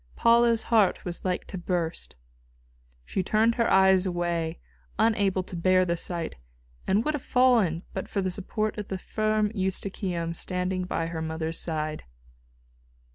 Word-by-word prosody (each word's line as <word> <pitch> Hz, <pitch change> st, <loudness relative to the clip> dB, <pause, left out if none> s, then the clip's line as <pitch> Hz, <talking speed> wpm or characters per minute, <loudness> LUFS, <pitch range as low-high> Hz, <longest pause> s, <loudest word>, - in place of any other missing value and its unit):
Paula's 235 Hz, -1 st, +4 dB
heart 215 Hz, -5 st, +2 dB
was 175 Hz, -1 st, -5 dB
like 180 Hz, -1 st, -1 dB
to 190 Hz, -, -7 dB
burst. 175 Hz, -2 st, -2 dB, 0.9 s
She 190 Hz, -, -1 dB
turned 220 Hz, +5 st, +2 dB
her 230 Hz, -1 st, +1 dB
eyes 190 Hz, 0 st, +5 dB
away, 175 Hz, -2 st, -2 dB, 0.4 s
unable 200 Hz, -4 st, +2 dB
to 185 Hz, -, -9 dB
bear 185 Hz, +2 st, +3 dB
the 170 Hz, -1 st, 0 dB
sight, 170 Hz, -, -4 dB, 0.5 s
and 205 Hz, +4 st, +2 dB
would 305 Hz, -, +1 dB
have 295 Hz, -, -3 dB
fallen 235 Hz, -12 st, +3 dB
but 190 Hz, -, -4 dB
for 200 Hz, -, -2 dB
the 185 Hz, -1 st, 0 dB
support 215 Hz, +3 st, -2 dB
of 205 Hz, -, -5 dB
the 190 Hz, -, -3 dB
firm 215 Hz, +1 st, 0 dB
Eustochium 185 Hz, -3 st, -2 dB
standing 180 Hz, +1 st, -2 dB
by 165 Hz, -2 st, -2 dB
her 165 Hz, -1 st, -4 dB
mother's 160 Hz, 0 st, -3 dB
side. 155 Hz, -2 st, -3 dB
185 Hz, 150 wpm, -27 LUFS, 170-215 Hz, 0.9 s, eyes